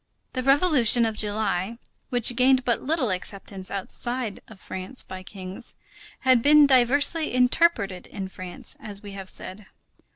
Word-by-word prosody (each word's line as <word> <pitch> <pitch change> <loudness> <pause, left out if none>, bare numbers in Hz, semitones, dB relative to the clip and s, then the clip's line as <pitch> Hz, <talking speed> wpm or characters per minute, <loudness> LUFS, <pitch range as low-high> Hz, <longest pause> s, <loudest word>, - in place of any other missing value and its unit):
The 255 - -2
Revolution 270 -4 +4
of 220 -1 -2
July, 210 0 -1 0.3
which 245 -2 +3
gained 255 +1 +3
but 240 -2 0
little 275 - 0
acceptance 190 0 -5
outside 235 +3 -3
of - - -15
France 185 +9 -3
by 185 0 -9
kings, 190 +3 -6 0.5
had 255 -2 +4
been 295 +2 +6
diversely 285 +5 +3
interpreted 250 - +1
in 195 -3 -6
France, 185 +6 -6
as 210 -5 -2
we 205 - -9
have 195 -1 -6
said. 190 +2 -9
230 Hz, 140 wpm, -24 LUFS, 195-260 Hz, 0.5 s, been